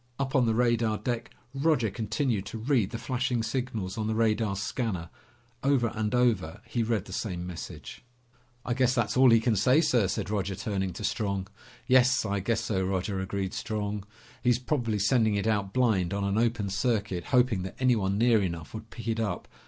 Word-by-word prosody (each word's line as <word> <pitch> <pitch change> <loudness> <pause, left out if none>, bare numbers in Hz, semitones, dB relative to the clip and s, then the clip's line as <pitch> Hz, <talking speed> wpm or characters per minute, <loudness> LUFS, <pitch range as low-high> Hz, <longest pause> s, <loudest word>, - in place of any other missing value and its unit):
Up 135 -1 -2
on 125 -3 +4
the 110 - +2
radar 115 -2 +2
deck, 115 +2 -3 0.2
Roger 135 -6 +1
continued 110 -2 -1
to - - -6
read 115 -3 +1
the - - -5
flashing 125 -1 -1
signals 115 -5 -3
on 110 - -1
the 110 - -1
radar 110 -2 +1
scanner. 100 -4 -3 0.5
Over 135 -4 +2
and 110 +1 -1
over, 120 -10 +1
he 120 - -2
read 110 -3 0
the - - -9
same 90 -5 -3
message. 90 -2 -8 0.6
"I 120 - 0
guess 130 +1 +2
that's 120 -4 0
all 130 0 +7
he 115 -1 +6
can 115 0 +1
say, 125 +9 +4
sir," 125 - +3
said 95 - -3
Roger, 100 -2 -1
turning 95 -2 -2
to - - -7
Strong. 100 -2 -2 0.4
"Yes, 130 -1 +4
I 100 -1 -1
guess 115 +4 0
so, 100 -4 -1
Roger," 95 +1 -1
agreed 95 0 -3
Strong. 105 -2 -3 0.4
"He's 120 -2 +3
probably 125 -4 -1
sending 110 +1 +3
it 100 - -1
out 100 -3 0
blind, 100 -7 +1
on 100 - -1
an 100 0 0
open 115 -4 0
circuit, 100 -5 -1
hoping 125 -6 +2
that 95 +1 -6
anyone 110 -7 +2
near 115 -1 +4
enough 85 -4 -4
would 110 0 -8
pick 115 - -9
it 115 0 0
up. 100 -6 -2
110 Hz, 190 wpm, -28 LUFS, 100-120 Hz, 0.6 s, all